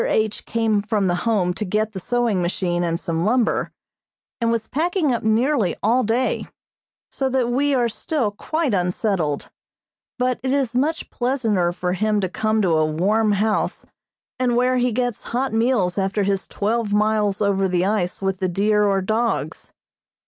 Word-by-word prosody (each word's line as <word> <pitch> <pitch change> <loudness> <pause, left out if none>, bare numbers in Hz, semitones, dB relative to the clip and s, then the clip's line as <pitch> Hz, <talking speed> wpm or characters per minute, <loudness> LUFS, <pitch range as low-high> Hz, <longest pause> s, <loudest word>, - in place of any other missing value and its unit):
H. 215 -1 -1
came 220 -2 +1
from 210 -1 0
the 180 - +2 0.2
Home 185 -5 +1
to 215 - -4
get 215 +2 -1
the 195 - -6
sewing 235 -1 0
machine 175 0 -1
and 170 -1 -1
some 165 -1 -2
lumber, 235 +4 +1 0.7
and 230 -1 +1
was 230 -1 -1
packing 320 -1 0
up 235 - -1
nearly 220 - +1
all 240 +5 +3
day, 235 +4 0 0.6
so 270 -1 -1
that 255 -2 0
we 280 +3 +2
are 245 -2 +2
still 235 0 -2
quite 305 +5 -2
unsettled, 180 -4 -1 0.7
but 250 -1 0
it 260 - -1
is 270 -4 0
much 300 +6 -1
pleasanter 225 -9 0
for 180 0 -2
him 215 +2 +1
to 190 -2 -1
come 215 +2 0
to 170 -4 +2
a 155 - +3
warm 210 +7 +2
house 210 +2 0 0.5
and 250 -2 +1
where 250 +1 +2
he 250 0 +1
gets 245 -1 -2
hot 265 -2 -1
meals 225 -5 +1
after 195 +2 0
his 195 -1 -1
twelve 220 +1 -1
miles 210 -1 +1
over 195 -2 +1
the 180 0 +1
ice 195 -2 -1
with 190 -1 -1
the 185 -2 0
deer 210 +3 +2
or 195 -1 +1
dogs. 225 +4 -2
215 Hz, 170 wpm, -22 LUFS, 195-245 Hz, 0.7 s, all